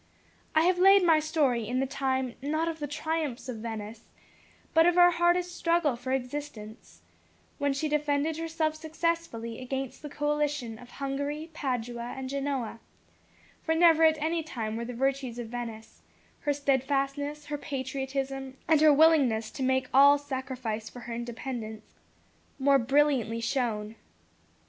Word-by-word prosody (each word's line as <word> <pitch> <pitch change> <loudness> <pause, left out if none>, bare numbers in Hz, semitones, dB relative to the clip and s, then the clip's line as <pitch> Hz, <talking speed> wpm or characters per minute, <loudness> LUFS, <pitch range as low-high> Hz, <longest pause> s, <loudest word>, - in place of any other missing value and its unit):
I 315 - +6
have 355 +1 +3
laid 390 +1 +7
my 325 -3 +5
story 290 -8 +1
in 250 +2 -1
the 270 - +1
time 265 -2 -1
not 310 +4 -1
of 325 -1 -3
the 295 - -3
triumphs 300 -3 -3
of 250 -3 -5
Venice, 220 0 -7 0.6
but 325 +1 +6
of 350 - +3
her 355 0 +7
hardest 350 +1 +1
struggle 335 -6 +1
for 250 +2 -5
existence 250 -4 -5 0.6
when 285 -1 +1
she 275 +3 -1
defended 300 +1 0
herself 325 -1 -1
successfully 315 -7 -3
against 265 0 -4
the 295 - -7
coalition 295 -6 -1
of 245 - -13
Hungary, 285 +4 -4
Padua, 245 -4 -3
and 265 -1 -5
Genoa 275 -5 -2 0.8
for 320 - 0
never 325 -1 +6
at 315 -1 +5
any 325 +2 -1
time 230 -9 -4
were 235 +1 -3
the 245 - -6
virtues 265 -1 -1
of 235 -2 -6
Venice, 225 -2 -7 0.4
her 290 - 0
steadfastness, 280 +1 -1
her 295 0 -4
patriotism, 270 -1 -4
and 315 -2 +4
her 310 -1 +7
willingness 275 -8 +4
to 275 - -8
make 260 0 +1
all 280 +2 +7
sacrifice 260 -6 -4
for 245 - -11
her 235 0 -6
independence, 235 -2 -6 0.6
more 275 0 +4
brilliantly 265 -3 +2
shown. 225 -3 -1
275 Hz, 150 wpm, -28 LUFS, 245-310 Hz, 0.8 s, laid